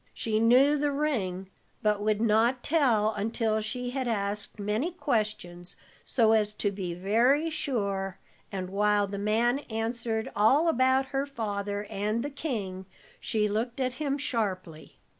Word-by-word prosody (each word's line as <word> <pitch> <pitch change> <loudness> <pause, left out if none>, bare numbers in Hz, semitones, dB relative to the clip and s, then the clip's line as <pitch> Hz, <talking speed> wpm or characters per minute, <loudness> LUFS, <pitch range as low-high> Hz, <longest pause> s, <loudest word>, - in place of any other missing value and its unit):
She 215 -1 0
knew 260 +6 +5
the 295 0 +1
ring, 195 -11 -2 0.3
but 210 -1 +2
would 210 0 +1
not 230 +3 +2
tell 240 -9 +3
until 220 +1 0
she 245 +3 -4
had 260 -1 -2
asked 205 -2 -2
many 210 - -1
questions, 215 - -2 0.3
so 225 -3 +3
as 210 -1 +2
to 205 -1 -1
be 185 -3 -4
very 240 - +2
sure, 200 - -2 0.3
and 185 -2 -4
while 205 +1 +2
the 200 0 -5
man 230 +5 +2
answered 225 0 -2
all 265 +11 +4
about 260 -2 +3
her 275 +1 0
father 205 -5 -3
and 210 +4 -1
the 290 - -4
king, 200 - -4 0.3
she 215 -1 0
looked 230 +5 -2
at 255 -1 0
him 280 -2 0
sharply. 190 - -3
220 Hz, 145 wpm, -28 LUFS, 205-255 Hz, 0.3 s, knew